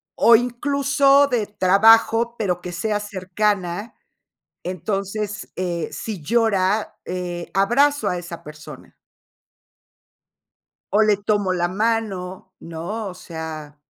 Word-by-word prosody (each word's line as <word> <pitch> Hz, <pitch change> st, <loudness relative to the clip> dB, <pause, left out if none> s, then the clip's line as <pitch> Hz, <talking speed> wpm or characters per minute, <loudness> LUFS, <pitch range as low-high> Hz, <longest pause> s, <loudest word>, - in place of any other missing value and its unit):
o 235 Hz, -, +6 dB
incluso, 280 Hz, +3 st, +3 dB
de 240 Hz, -5 st, 0 dB
trabajo, 225 Hz, +4 st, +4 dB
pero 180 Hz, -5 st, -1 dB
que 180 Hz, 0 st, -7 dB
sea 210 Hz, +4 st, -1 dB
cercana. 205 Hz, 0 st, -2 dB, 0.7 s
Entonces, 195 Hz, +3 st, -4 dB
eh, 175 Hz, -3 st, -2 dB
si 210 Hz, -6 st, -6 dB
llora, 210 Hz, +2 st, +1 dB
eh, 175 Hz, -1 st, -5 dB
abrazo 240 Hz, +4 st, +3 dB
a 180 Hz, -, -1 dB
esa 170 Hz, -1 st, -9 dB
persona. 150 Hz, 0 st, -12 dB, 2.0 s
O 210 Hz, -, +4 dB
le 210 Hz, -, +5 dB
tomo 205 Hz, -3 st, +1 dB
la 175 Hz, -1 st, 0 dB
mano, 195 Hz, -3 st, -2 dB
¿no? 175 Hz, +7 st, -5 dB
O 185 Hz, -, -6 dB
sea 160 Hz, -4 st, -8 dB
200 Hz, 110 wpm, -21 LUFS, 180-225 Hz, 2.0 s, o